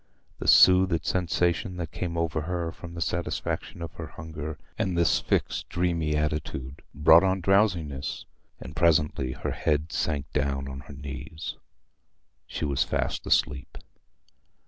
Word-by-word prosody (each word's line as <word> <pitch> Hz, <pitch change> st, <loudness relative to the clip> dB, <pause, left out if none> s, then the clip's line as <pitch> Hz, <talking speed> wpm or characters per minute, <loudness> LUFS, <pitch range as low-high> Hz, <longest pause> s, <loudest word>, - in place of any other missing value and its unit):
The -, -, -4 dB
soothed 90 Hz, -2 st, +6 dB
sensation 90 Hz, 0 st, 0 dB
that 85 Hz, -3 st, -4 dB
came 85 Hz, -2 st, -4 dB
over 80 Hz, -1 st, 0 dB
her 85 Hz, +1 st, -2 dB
from 85 Hz, -5 st, -10 dB
the 85 Hz, -, -5 dB
satisfaction 85 Hz, 0 st, -3 dB
of 85 Hz, -, -6 dB
her 80 Hz, -, -7 dB
hunger, 80 Hz, -1 st, -7 dB, 0.2 s
and 90 Hz, -2 st, -1 dB
this 85 Hz, -1 st, +3 dB
fixed -, -, -1 dB
dreamy 85 Hz, -3 st, 0 dB
attitude, 75 Hz, -3 st, -3 dB
brought 80 Hz, +4 st, +7 dB
on 95 Hz, 0 st, +2 dB
drowsiness, 85 Hz, -8 st, +1 dB, 0.3 s
and 75 Hz, -, -9 dB
presently 75 Hz, -5 st, +2 dB
her -, -, -4 dB
head 75 Hz, +1 st, 0 dB
sank 70 Hz, -4 st, -1 dB
down 70 Hz, -1 st, -1 dB
on 65 Hz, 0 st, -6 dB
her 70 Hz, +1 st, -11 dB
knees. 70 Hz, +3 st, -6 dB, 0.9 s
She -, -, -3 dB
was 70 Hz, -2 st, +1 dB
fast -, -, -2 dB
asleep. -, -, +1 dB
80 Hz, 140 wpm, -27 LUFS, 75-85 Hz, 0.9 s, brought